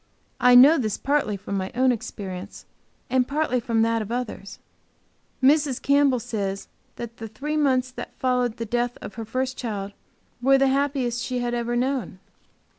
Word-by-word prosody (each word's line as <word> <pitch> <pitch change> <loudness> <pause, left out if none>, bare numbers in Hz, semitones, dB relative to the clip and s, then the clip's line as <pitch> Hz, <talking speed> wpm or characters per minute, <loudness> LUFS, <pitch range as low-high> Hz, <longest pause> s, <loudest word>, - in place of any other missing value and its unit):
I 250 0 +6
know 275 +6 +8
this 215 -5 -1
partly 275 -7 0
from 200 0 -4
my 190 0 -3
own 255 +1 +4
experience 200 -4 -6 0.4
and 255 0 +1
partly 290 -3 0
from 230 -1 +1
that 230 0 +1
of 215 +1 -6
others. 240 -5 -5 0.9
Mrs. 285 -1 +3
Campbell 280 -2 +3
says 200 -3 -4 0.3
that 235 -1 -8
the 225 - -6
three 285 +8 -4
months 260 -4 +2
that - - -9
followed 250 -2 0
the 230 - -4
death 240 +2 -1
of - - -8
her 225 +1 -6
first 255 +3 -2
child 205 -5 -4 0.5
were 270 +2 +5
the 270 0 +3
happiest 265 -3 0
she 255 0 -3
had 240 -1 -2
ever 240 0 -1
known. 255 -5 -1
245 Hz, 170 wpm, -24 LUFS, 225-265 Hz, 0.9 s, know